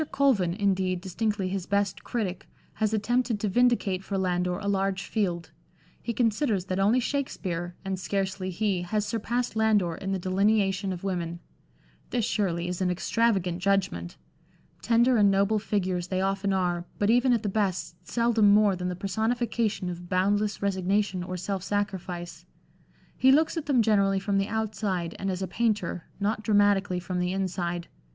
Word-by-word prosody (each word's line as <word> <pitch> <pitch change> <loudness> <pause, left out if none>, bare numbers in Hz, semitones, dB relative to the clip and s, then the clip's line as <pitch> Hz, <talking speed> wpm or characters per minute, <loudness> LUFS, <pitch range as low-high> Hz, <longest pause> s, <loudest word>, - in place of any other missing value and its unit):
Colvin, 210 -12 +2
indeed, 190 -3 +1
distinctly 200 +1 -2
his 185 -1 -3
best 200 -1 0
critic, 200 -7 -3 0.3
has 215 -1 0
attempted 230 +1 0
to 210 - -1
vindicate 210 -4 +2
for 195 0 -3
Landor 180 -1 0
a 200 - -5
large 195 -1 0
field; 180 -6 -2 0.5
he 235 - -3
considers 225 -3 +1
that 185 0 -2
only 210 +6 +4
Shakspere, 185 -10 -3
and 190 -1 -2
scarcely 190 0 -2
he, 190 0 0
has 210 +4 -1
surpassed 235 +2 -2
Landor 215 -6 +2
in 195 +4 -5
the 195 - 0
delineation 195 +1 +1
of 180 -1 -6
women. 175 -3 -3 0.7
This, 240 -3 0
surely, 175 -5 -1
is 180 +1 -3
an 185 - +2
extravagant 185 -1 +1
judgment. 190 - 0 0.6
Tender 235 +2 +3
and 205 -2 +5
noble 200 +2 +2
figures 185 -4 -1
they 185 0 -1
often 195 +1 0
are, 175 -2 0
but 205 +1 +2
even 245 +2 +4
at 235 -2 +2
the - - -1
best 185 -5 -1
seldom 230 -3 +3
more 205 -1 +5
than 180 0 -3
the 180 - -3
personification 220 +1 -1
of 175 0 -6
boundless 205 +3 +1
resignation 195 0 0
or 185 +1 -4
self 190 +1 -3
sacrifice. 180 -4 -3 0.7
He 265 - +5
looks 310 +5 +3
at 315 -3 -4
them 255 -5 +4
generally 200 -3 +3
from 195 0 0
the 195 - 0
outside 210 -6 -2
and 195 - -2
as 185 0 -2
a - - -2
painter, 205 -4 -1
not 210 +2 0
dramatically 205 -3 +2
from 180 0 -3
the 180 +1 0
inside. 175 -2 -2
195 Hz, 165 wpm, -27 LUFS, 185-215 Hz, 0.7 s, and